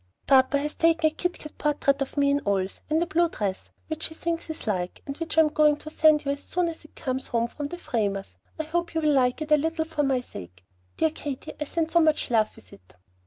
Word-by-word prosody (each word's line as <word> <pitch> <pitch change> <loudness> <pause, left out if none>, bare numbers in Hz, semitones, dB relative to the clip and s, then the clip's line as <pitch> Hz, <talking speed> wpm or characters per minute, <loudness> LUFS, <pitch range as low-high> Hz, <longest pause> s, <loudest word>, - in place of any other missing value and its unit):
Papa 265 +1 +5
has 295 +1 -2
taken 330 -1 +3
a - - -23
kit 355 +2 -2
kat 305 - -11
portrait 285 -2 +1
of 275 - -3
me 280 0 +4
in 285 0 +1
oils, 195 -1 0
and 315 +2 +2
a - - -2
blue 345 -1 +2
dress, 200 -9 -3 0.2
which 315 0 -4
he 320 - -11
thinks 330 0 -3
is 315 - -6
like, 180 -5 -2
and 275 - -5
which 325 -1 -4
I - - +9
am 310 - +3
going 300 -1 +4
to 310 - -9
send 310 -1 +4
you 280 - +1
as 280 0 -4
soon 355 -1 -1
as 330 - -9
it 305 - -18
comes 260 0 -3
home 235 -1 0
from 290 +4 -5
the 350 - -7
framers. 200 - -2 0.2
I - - 0
hope 340 +2 -2
you 320 - +1
will 305 -1 +3
like 255 +2 +2
it 305 - -10
a 300 - +7
little 320 +2 -1
for 320 -2 -2
my 270 -3 +1
sake. 90 - -11 0.3
Dear 320 - +2
Katy, 285 -4 -6
I - - 0
send 325 +2 -1
so 340 - +5
much 310 -5 +2
love 220 -2 +3
with 95 - -16
it. 90 -2 -18
300 Hz, 260 wpm, -26 LUFS, 255-320 Hz, 0.3 s, I